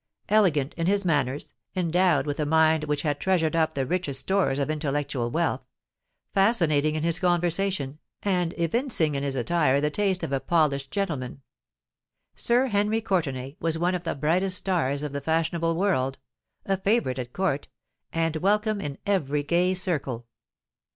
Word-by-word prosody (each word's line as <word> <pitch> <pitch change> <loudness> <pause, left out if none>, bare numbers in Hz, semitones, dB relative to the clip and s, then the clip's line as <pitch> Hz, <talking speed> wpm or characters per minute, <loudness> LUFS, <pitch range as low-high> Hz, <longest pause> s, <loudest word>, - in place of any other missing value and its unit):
Elegant 175 -10 +3
in 165 0 -1
his 200 0 +2
manners—endowed 160 +2 0
with 145 0 -3
a 150 - +1
mind 160 0 +3
which 150 -1 -1
had 145 -2 -1
treasured 170 -4 +1
up 160 -1 +1
the 135 -1 0
richest 145 -3 -1
stores 190 -9 +1
of 140 - 0
intellectual 145 -5 -2
wealth—fascinating 160 - -1
in 155 - -2
his 170 -1 +1
conversation—and 175 0 -1
evincing 170 - +1
in 140 - -2
his 140 -1 -1
attire 140 +1 +2
the 150 +1 0
taste 195 0 0
of - - -3
a 135 - +1
polished 140 -4 +1
gentleman, 140 -9 -3 0.9
Sir 245 +2 +2
Henry 210 -1 +1
Courtenay 145 - -2
was 165 -1 +1
one 175 +2 +1
of 180 -1 -3
the 165 - -2
brightest 180 +6 +2
stars 150 -8 0
of 150 - -3
the 140 0 -4
fashionable 165 +2 0
world—a 135 - -2
favourite 195 - 0
at 125 -1 -5
Court—and 165 -1 -3
welcome 210 +4 +1
in 140 -2 -5
every 150 -8 0
gay 175 +4 +1
circle. 145 -10 -2
160 Hz, 145 wpm, -26 LUFS, 140-185 Hz, 0.9 s, Elegant